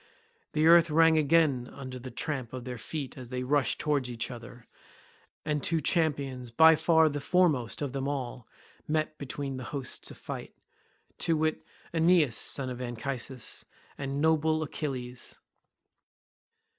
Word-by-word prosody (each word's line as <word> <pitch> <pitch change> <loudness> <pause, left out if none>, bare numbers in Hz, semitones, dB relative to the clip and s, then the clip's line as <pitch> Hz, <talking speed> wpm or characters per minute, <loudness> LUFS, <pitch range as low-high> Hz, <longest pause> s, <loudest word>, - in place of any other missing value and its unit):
The 155 0 +2
earth 170 0 +7
rang 165 +1 +5
again 145 -5 +3
under 130 -2 -7
the 130 +1 -8
tramp 130 -1 -3
of 130 -1 -5
their 125 -2 -5
feet 140 +1 -6
as 125 -2 -9
they 125 0 -3
rushed 140 -1 +2
towards 145 -4 0
each 115 +1 -3
other, 120 0 -10 0.8
and 150 -1 0
two 165 +2 +1
champions, 140 -6 0
by 160 +7 +7
far 160 0 +4
the 145 -1 -2
foremost 150 -6 +2
of 140 - -2
them 135 0 -2
all, 130 -4 -4 0.4
met 155 0 -1
between 140 -1 -4
the 130 - -6
hosts 135 0 -4
to - - -7
fight—to 165 -1 -6
wit, 155 0 0 0.3
Aeneas 165 -6 +4
son 130 -2 -1
of 125 0 -6
Anchises, 125 +1 -4 0.3
and 140 0 -3
noble 160 0 +2
Achilles. 130 -5 -5
140 Hz, 145 wpm, -29 LUFS, 125-155 Hz, 0.8 s, earth